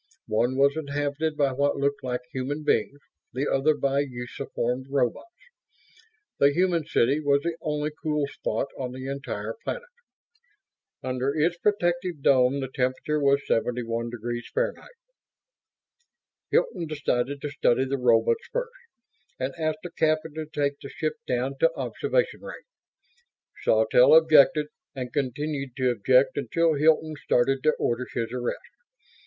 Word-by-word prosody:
One 120 +4 +1
was 140 +1 +4
inhabited 145 +1 -2
by 140 -2 +2
what 140 +2 0
looked 140 0 -1
like 125 -1 -2
human 140 +4 -3
beings; 140 +1 +1 0.3
the 135 +3 -1
other 150 +3 +2
by 140 0 +1
usuform 125 -1 -4
robots. 135 - -1 1.1
The 140 - +5
human 170 -1 +1
city 135 +6 +2
was 140 -1 +2
the 170 -1 -2
only 150 -1 -2
cool 150 -2 0
spot 140 0 -3
on 125 -2 -4
the 130 0 -7
entire 135 -6 -4
planet; 485 0 -5 1.1
under 130 +2 -1
its 165 +3 +2
protective 175 -6 0
dome 130 +1 +4
the 135 - -3
temperature 130 +3 0
was 140 0 +3
71°F. 120 - -2 1.8
Hilton 470 - +1
decided 140 -2 -1
to 145 - -4
study 130 -2 +2
the 135 0 -2
robots 115 -2 +3
first; - - -2 0.7
and 130 +1 -2
asked 155 -1 -2
the 175 - -7
captain 155 -1 0
to 155 0 -5
take 145 -2 -1
the 140 - -8
ship 155 -1 -2
down 130 +2 -1
to 165 - +4
observation - - -1
range. - - -9 1.0
Sawtelle - - +5
objected; 155 - +6 0.3
and 125 -2 -5
continued 140 -1 -2
to 130 -1 +2
object 125 +4 +3
until 160 +5 +1
Hilton 155 +1 +3
started 135 +2 +2
to 155 +2 +3
order 120 +2 -1
his 115 -1 -2
arrest. 125 -1 -2
140 Hz, 135 wpm, -26 LUFS, 125-155 Hz, 1.8 s, objected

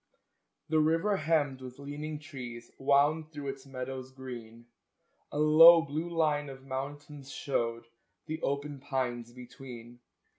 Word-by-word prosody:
The 155 0 +3
river 165 +7 +3
hemmed 150 -6 +1
with 130 -1 -9
leaning 145 +2 -5
trees 125 -5 -9
Wound 145 +3 +3
through 145 -2 -5
its 135 0 -7
meadows 130 0 -6
green; 120 -3 -9 0.7
A - - -4
low, 160 +2 +9
blue 160 +3 -3
line 150 -4 +1
of 135 0 -11
mountains 140 +1 -6
showed 115 -5 -2 0.4
The 160 0 -5
open 140 0 -2
pines 125 -4 -2
between. 120 -1 -11
140 Hz, 125 wpm, -31 LUFS, 130-150 Hz, 0.7 s, low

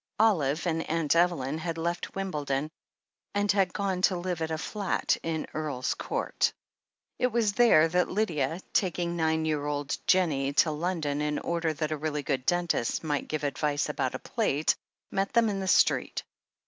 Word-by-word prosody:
Olive 170 -10 +2
and 165 -1 -1
Aunt 165 -1 +1
Evelyn 160 -4 +2
had 165 0 -3
left 170 +1 -3
Wimbledon 150 -6 -2 0.6
and 205 -1 +3
had 195 -3 +2
gone 195 -2 -1
to 185 -1 +3
live 175 -1 -3
at 160 - -1
a 160 - -1
flat 200 +3 0
in 160 -1 -2
Earl's 145 -5 -2
Court. - - -1 0.7
It 250 - +3
was 230 -4 +1
there 210 -9 +6
that 180 +2 +1
Lydia, 170 -5 -1
taking 175 -2 0
nine 160 -1 +1
year 155 -2 0
old 145 -1 -2
Jennie 145 -7 +2
to 155 +2 +4
London 155 -2 -1
in 150 0 0
order 170 -1 -1
that 155 0 -3
a 155 - -1
really 150 -1 -2
good 130 -2 -2
dentist 175 -9 +1
might 145 -2 -1
give 155 -1 -3
advice 145 +1 0
about 135 -3 -1
a - - -1
plate, 155 - 0 0.4
met 195 0 -1
them 235 -1 +4
in 200 -1 -2
the 190 - -3
street. - - +3
160 Hz, 175 wpm, -28 LUFS, 150-185 Hz, 0.7 s, there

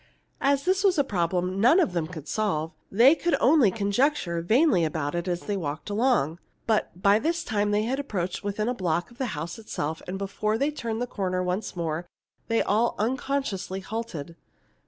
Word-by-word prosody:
As 280 +1 +2
this 375 +1 +2
was 385 -4 +4
a 285 - +4
problem 180 -3 -1
none 260 - +6
of 265 - +2
them 165 -3 -1
could 160 -4 -9
solve, 165 -7 -1 0.2
they 240 +8 +7
could 345 +1 +1
only 265 -4 +5
conjecture 200 - 0
vainly 225 - +3
about 155 -2 -1
it 175 +1 -2
as 175 -1 -1
they 205 - -3
walked 160 +1 -4
along. 205 - +1 0.3
But 215 -5 0
by 200 +1 +5
this 340 +5 -1
time 205 -7 0
they 205 +1 +2
had 260 +5 -1
approached 190 -11 -3
within 205 +2 -2
a 245 - +1
block 180 -1 -1
of 240 - -18
the 260 - 0
house 170 +6 -5
itself, 160 -7 -4
and 185 +1 -3
before 200 +2 -1
they 280 +5 +1
turned 235 -5 -3
the - - 0
corner 185 -5 -2
once 180 +4 -2
more 170 0 -3 0.4
they 230 -1 +2
all 220 +4 +1
unconsciously 240 -5 -2
halted. 190 -7 -5
205 Hz, 190 wpm, -26 LUFS, 175-245 Hz, 0.4 s, they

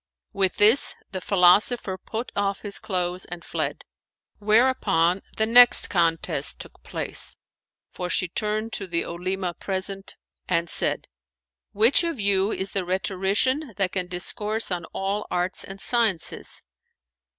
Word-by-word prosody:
"[FN#438] - - -51
With 190 -1 +3
this 220 +6 +4 0.2
the 185 -1 -5
philosopher 195 +3 +3
put 220 +5 -6
off 200 -1 -1
his 205 -1 -3
clothes 180 -1 -2
and 175 0 -9
fled: - - -3 0.6
whereupon 205 -5 +2 0.2
the 220 - +2
next 245 -3 +6
contest 165 -3 0
took - - -12
place, - - -3 0.6
for 180 -1 -5
she 180 - +1
turned 215 +5 -2
to 195 - -1
the 170 -1 -1
Olema 180 +1 -3
present 195 +1 -5 0.3
and 170 0 0
said, - - +1 0.6
"Which 225 - +4
of 335 -7 -3
you 200 0 +1
is 190 +1 -3
the 195 - -1
rhetorician 195 - 0
that 195 -3 0
can 185 -2 -2
discourse 210 +5 0
of 175 -2 -3
all 200 +2 -3
arts 180 +1 +1
and 195 +1 -9
sciences?" 220 -7 -1
195 Hz, 140 wpm, -24 LUFS, 180-215 Hz, 0.6 s, next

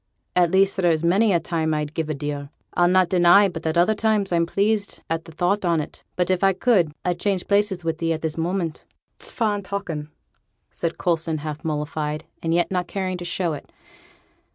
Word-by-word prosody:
At 175 -1 +4
least, 195 +3 +3
there 175 -3 +3
is 160 0 0
many 200 +6 +4
a 175 - +3
time 160 -2 -1
I'd 150 0 -3
give 160 -1 -2
a 155 - -1
deal. 145 0 -4 0.2
I'll 175 - +4
not 185 0 +4
deny 180 +3 +6
but 165 -3 -5
at 160 +1 0
other 175 +5 +4
times 215 -3 +1
I'm 170 -1 +2
pleased 205 +2 0
at 165 0 -1
the - - -11
thought 180 +6 0
on't. 165 -4 -1
But, 180 0 +1
if 185 +1 0
I 195 0 +5
could 185 -5 +2
I'd 175 -1 0
change 195 -2 -1
places 200 -3 +1
wi' 165 - +2
thee 165 +1 -2
at 160 0 -2
this 160 -1 -2
moment.' 170 -1 -2 0.3
'It's - - -6
fine 210 -3 0
talking,' 180 -6 -4 0.6
said 170 -1 -3
Coulson, 165 -2 0
half 155 0 -5
mollified, 150 0 -2 0.2
and 165 - -1
yet 175 +2 +2
not 180 -2 -1
caring 185 0 -2
to 175 - -7
show 170 -1 -1
it. 145 - -9
175 Hz, 205 wpm, -23 LUFS, 160-190 Hz, 0.6 s, deny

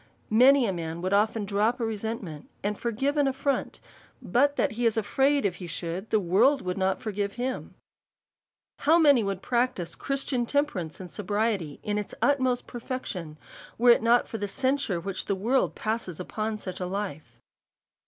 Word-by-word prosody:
Many 255 +4 +6
a 195 - 0
man 165 0 -5
would 185 +1 0
often 210 +1 +2
drop 210 +5 +1
a - - -1
resentment^ 220 -8 -4 0.2
and 205 +1 0
forgive 245 +7 -1
an 290 -1 +3
affront, 275 +1 -1 0.4
but 285 +4 +2
that - - +1
he 235 +2 +1
is 225 - 0
afraid, 270 +5 +2
if 180 -3 0
he 180 - -7
should, 170 +5 -4
the 220 - +3
world 200 +10 +3
would 180 0 -2
not 190 -1 0
forgive 205 -2 -3
him. 255 +2 -4 1.0
How 320 +3 +5
many 285 -8 +5
would 195 -1 -3
practise 240 -8 0
Christian 270 -3 -2
temperance 230 - -1
and 180 -3 -9
sobriety 205 -5 -1
in 210 0 -1
its 210 - -6
utmost 260 -3 +2
perfection, 225 - -6 0.4
were 240 +1 +6
it - - +5
not 235 +2 +4
for 225 - -5
the 205 - -2
censure 260 -3 0
which 190 +2 -4
the 200 - 0
world 235 +8 +1
passes 215 -6 -3
upon 215 +4 -3
such 185 -3 -7
a 180 - -2
life. 170 - -5
215 Hz, 175 wpm, -27 LUFS, 190-255 Hz, 1.0 s, Many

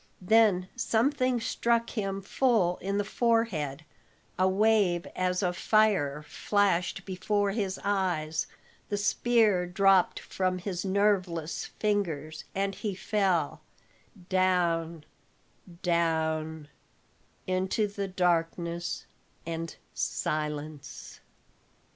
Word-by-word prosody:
Then 200 -3 +4
something 255 +1 +1
struck 235 0 0
him 195 -2 -3
full 205 -6 +2
in 200 +1 -2
the 205 - +1
forehead, 200 - 0 0.5
a 185 0 +4
wave 195 -3 +3
as 180 +1 0
of 180 -1 0
fire 190 -11 +2
flashed 190 +2 0
before 200 +2 0
his 195 -3 -2
eyes, 175 -6 0 0.4
the 205 - -1
spear 210 -3 +2
dropped 190 0 +3
from 185 -1 -2
his 180 -1 -4
nerveless 190 -5 0
fingers, 160 -8 -1
and 195 0 0
he 205 -1 -4
fell 185 -7 0 0.7
down 170 -4 +1 0.8
down 160 -2 0 0.8
into 185 +3 0 0.2
darkness 170 -1 -1 0.4
and 165 0 -4 0.2
silence. 150 -1 -4
185 Hz, 90 wpm, -29 LUFS, 165-205 Hz, 0.8 s, Then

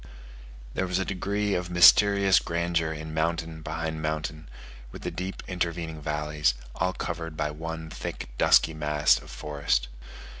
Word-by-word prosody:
There 95 - -1
was 90 0 0
a 95 - 0
degree 100 +2 -1
of 90 -1 -2
mysterious 100 +2 +6
grandeur 85 -1 -1
in 80 0 -6
mountain 80 0 -1
behind 80 0 -4
mountain, 75 0 -3 0.4
with - - -10
the - - -3
deep 95 +2 -5
intervening 85 -3 -3
valleys, 75 -3 0 0.2
all 90 0 -1
covered 80 -4 -5
by 75 -1 -1
one 80 +1 -6
thick, - - -6
dusky 80 - +5
mass 75 -1 +2
of - - -14
forest. 70 -5 -1
80 Hz, 145 wpm, -27 LUFS, 75-90 Hz, 0.4 s, mysterious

